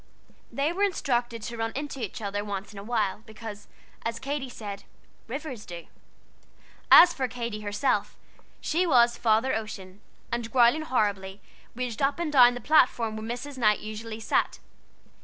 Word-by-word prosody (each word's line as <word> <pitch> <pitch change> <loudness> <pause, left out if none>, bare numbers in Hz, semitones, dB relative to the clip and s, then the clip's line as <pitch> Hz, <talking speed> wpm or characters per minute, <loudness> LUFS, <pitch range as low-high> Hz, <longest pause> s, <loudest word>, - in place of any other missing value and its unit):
They 285 +4 0
were 385 - -4
instructed 240 - 0
to 235 +2 -5
run 225 0 -2
into 280 -2 -4
each 215 +1 -5
other 205 0 -2
once 200 0 -5
in 200 - -8
a - - -8
while, 210 -4 -1
because, 215 -1 -9 0.4
as 230 0 -2
Katy 270 +1 -4
said, 205 -4 -7 0.4
"rivers 265 -2 -6
do." 170 -3 -9 1.0
As 345 0 +9
for 265 -4 -1
Katy 235 -4 -5
herself, 210 +6 -1 0.4
she 350 +3 0
was 240 -5 +5
"Father 230 +3 +2
Ocean," 205 -3 -6 0.3
and, 235 -1 -3
growling 245 +5 +5
horribly, 205 -8 -1 0.4
raged 245 -3 -4
up 275 +3 +2
and 335 -3 -2
down 245 -3 +7
the 245 - -6
platform 245 -6 +3
where 220 +1 -6
Mrs. 280 +1 -8
Knight 215 -3 +3
usually 215 +1 -6
sat. 220 - 0
230 Hz, 160 wpm, -27 LUFS, 210-265 Hz, 1.0 s, As